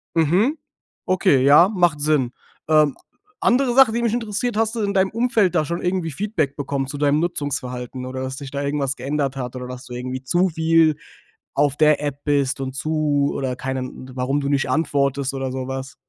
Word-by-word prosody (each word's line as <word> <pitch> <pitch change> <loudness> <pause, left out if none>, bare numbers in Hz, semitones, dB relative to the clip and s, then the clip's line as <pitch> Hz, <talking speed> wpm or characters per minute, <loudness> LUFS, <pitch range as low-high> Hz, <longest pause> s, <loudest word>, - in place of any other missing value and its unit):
Mhm, 180 - +2 0.5
okay, 185 -7 +3
ja, 150 +6 +7
macht 175 -7 +1
Sinn. 145 -5 +1 0.4
Ähm, 155 -2 +4 0.4
andere 245 0 +2
Sache, 265 -3 +6
die 235 +1 -1
mich 230 -2 +1
interessiert: 230 0 -2
Hast 225 +1 +1
du 230 - -3
in 200 -1 0
deinem 190 -1 +2
Umfeld 225 -6 +1
da 155 - +2
schon 170 +3 -3
irgendwie 180 -2 -1
Feedback 160 -4 -2
bekommen 140 -1 -2
zu 145 - -6
deinem 145 +1 +2
Nutzungsverhalten 130 -6 -3
oder 130 0 -5
dass 130 0 -4
sich 140 -1 -8
da 140 0 -3
irgendwas 140 -1 -1
geändert 135 +1 -2
hat? 125 -2 -5
Oder 125 0 -6
dass 125 0 -8
du 125 - -8
irgendwie 130 +1 -5
zu 175 +7 +2
viel 160 -1 +3 0.6
auf 145 -1 +2
der 150 -1 +4
App 145 -1 -4
bist 140 -2 +1
und 130 -1 -4
zu 145 0 0
oder 130 -2 -2
keinen 130 0 -5
d 130 - -11
warum 135 +3 0
du 140 - -2
nicht 140 -1 +1
antwortest 140 -3 0
oder 135 -1 -3
sowas? 130 0 -5
145 Hz, 195 wpm, -21 LUFS, 135-175 Hz, 0.6 s, ja